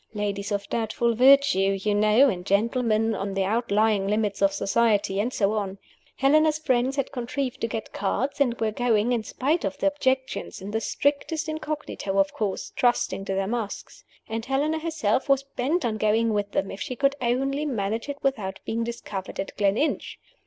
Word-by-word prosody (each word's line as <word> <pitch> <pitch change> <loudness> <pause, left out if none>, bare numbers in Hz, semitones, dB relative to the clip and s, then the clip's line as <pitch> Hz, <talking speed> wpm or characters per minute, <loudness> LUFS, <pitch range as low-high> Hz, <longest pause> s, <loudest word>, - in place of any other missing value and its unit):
Ladies 200 -1 -2
of 200 -1 -2
doubtful 235 +1 0
virtue, 255 -6 +5
you 210 +2 0
know, 215 +6 +5
and 180 -8 -2
gentlemen 225 +2 +1
on 195 -2 -3
the 195 - +1
outlying 215 -1 +1
limits 210 -1 0
of 195 0 +4
society, 200 -1 +1
and 230 +5 0
so 210 -5 +1
on. 200 -2 -2 0.4
Helena's 305 +3 +3
friends 260 -3 +1
had 275 -2 -2
contrived 255 +1 -3
to 230 - +1
get 220 0 -5
cards, 260 +9 -1
and 240 -4 +2
were 220 -1 0
going, 230 0 +1
in 240 -2 +1
spite 285 +9 -1
of 285 - -2
the - - -2
objections 265 -2 -1
in 195 +2 -7
the 220 +1 -1
strictest 295 +5 -1
incognito, 305 -10 -4
of 195 0 +2
course, 205 -3 -3
trusting 240 -5 +1
to 195 - -2
their 195 0 0
masks. 220 0 -5 0.2
And 225 0 -3
Helena 285 +5 0
herself 305 -7 -1
was 275 0 +4
bent 275 +4 -1
on 220 -2 -1
going 220 +1 +2
with 205 -1 -1
them, 195 - -1
if 195 - -8
she 255 - -3
could 275 +2 +2
only 270 +4 0
manage 225 0 -2
it 285 - -4
without 215 -9 -1
being 230 +1 -1
discovered 220 -5 -6
at 195 - -4
Gleninch. 205 +9 0
230 Hz, 180 wpm, -25 LUFS, 205-270 Hz, 0.4 s, virtue